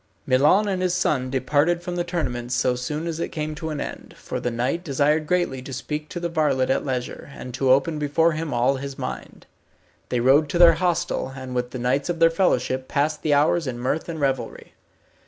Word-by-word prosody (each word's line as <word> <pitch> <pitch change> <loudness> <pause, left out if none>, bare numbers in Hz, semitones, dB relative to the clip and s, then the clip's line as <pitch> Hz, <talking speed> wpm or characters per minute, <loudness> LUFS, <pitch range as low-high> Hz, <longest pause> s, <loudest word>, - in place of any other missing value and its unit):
Milon 150 +11 +4
and 190 -2 -1
his 180 -1 +1
son 130 -7 0
departed 145 +6 +1
from 175 0 -4
the 175 - 0
tournament 130 -9 -3
so 125 0 +1
soon 150 +6 -4
as 165 -1 -3
it - - -2
came 155 0 -4
to 160 +1 -5
an 150 -2 -4
end, - - -7
for - - -5
the 125 - -1
knight 125 +9 -1
desired 150 0 +1
greatly 175 -7 0
to 130 - -9
speak 150 +4 -5
to 175 - -5
the 170 - -2
varlet 150 -6 +1
at - - +1
leisure, 130 0 -4
and 125 - -8
to 130 +1 0
open 145 +4 +3
before 150 +3 +2
him 155 -1 -3
all 125 +3 +2
his 140 0 -6
mind. - - -7 0.6
They 125 - 0
rode 140 +5 +4
to 170 - -1
their 170 -1 +8
hostel, 175 -6 0
and 130 -1 -7
with 125 0 -1
the 130 - -6
knights 130 +5 0
of 175 - -1
their 165 0 +5
fellowship, 130 -7 0
passed 150 +2 0
the 150 -2 +2
hours 155 +2 +2
in 125 -2 -3
mirth 130 +7 -2
and 160 -1 -4
revelry. 135 -3 -2
145 Hz, 215 wpm, -23 LUFS, 130-165 Hz, 0.6 s, their